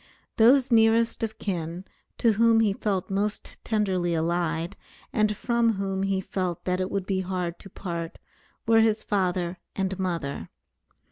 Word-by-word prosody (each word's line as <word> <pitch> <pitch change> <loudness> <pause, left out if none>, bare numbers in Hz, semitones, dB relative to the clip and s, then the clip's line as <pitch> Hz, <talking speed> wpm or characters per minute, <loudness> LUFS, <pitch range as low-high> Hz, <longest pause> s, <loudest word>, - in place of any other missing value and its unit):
Those 250 +3 +5
nearest 225 0 +4
of 220 -1 -3
kin, 175 -1 -4 0.3
to 230 - +4
whom 225 +1 +4
he 210 -3 +2
felt 195 -2 -2
most 205 +2 -3
tenderly 190 -6 0
allied, 165 +1 -1 0.4
and 210 -1 +1
from 235 -1 +2
whom 195 -1 -2
he 195 -1 0
felt 185 -3 -3
that 180 0 0
it 185 - -1
would 195 -2 -2
be 190 -1 0
hard 180 -2 -3
to 195 - -12
part, 170 -3 -5 0.5
were 225 0 +5
his 220 -1 +2
father 180 -3 -1 0.2
and 190 -1 -2
mother. 170 -7 -3
195 Hz, 150 wpm, -26 LUFS, 180-220 Hz, 0.5 s, Those